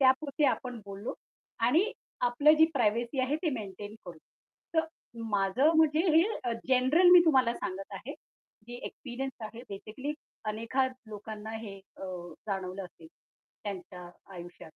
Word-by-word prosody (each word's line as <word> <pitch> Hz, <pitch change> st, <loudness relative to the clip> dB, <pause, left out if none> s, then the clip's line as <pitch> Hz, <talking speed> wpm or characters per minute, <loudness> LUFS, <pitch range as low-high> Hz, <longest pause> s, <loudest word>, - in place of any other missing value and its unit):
त्यापुरतं 280 Hz, +3 st, +3 dB
आपण 250 Hz, -3 st, -3 dB
बोललो. 200 Hz, +3 st, -5 dB, 0.5 s
आणि 320 Hz, -, +3 dB, 0.3 s
आपली 265 Hz, +5 st, +5 dB
जी 320 Hz, +1 st, +7 dB
प्रायव्हसी 235 Hz, +2 st, +1 dB
आहे, 260 Hz, +3 st, +2 dB
ते 320 Hz, 0 st, 0 dB
मेंटेन 205 Hz, -3 st, -6 dB
करू. 175 Hz, -3 st, -8 dB, 0.6 s
तर 320 Hz, 0 st, +4 dB, 0.5 s
माझं 205 Hz, +10 st, +4 dB
म्हणजे 315 Hz, -1 st, +5 dB, 0.2 s
हे 330 Hz, -, +8 dB, 0.2 s
अ, 240 Hz, -, 0 dB, 0.2 s
जनरल 265 Hz, +8 st, +5 dB
मी 360 Hz, -, +11 dB
तुम्हाला 260 Hz, -6 st, +4 dB
सांगत 195 Hz, +1 st, -5 dB
आहे. -, -, -7 dB, 0.5 s
जे 240 Hz, -, -8 dB
एक्सपिरियन्स 265 Hz, -1 st, -6 dB
आहे 230 Hz, +2 st, -8 dB
बेसिकली 220 Hz, +9 st, -5 dB, 0.4 s
अनेकदा 230 Hz, +5 st, +1 dB, 0.2 s
लोकांना 215 Hz, +1 st, -7 dB
हे 205 Hz, -3 st, -8 dB, 0.2 s
अ, -, -, -8 dB, 0.4 s
जाणवलं 190 Hz, -1 st, -3 dB
असेल, 165 Hz, -2 st, -15 dB, 0.6 s
त्यांच्या 180 Hz, -3 st, -6 dB, 0.3 s
आयुष्यात. 175 Hz, -2 st, -10 dB
235 Hz, 135 wpm, -30 LUFS, 200-275 Hz, 0.6 s, मी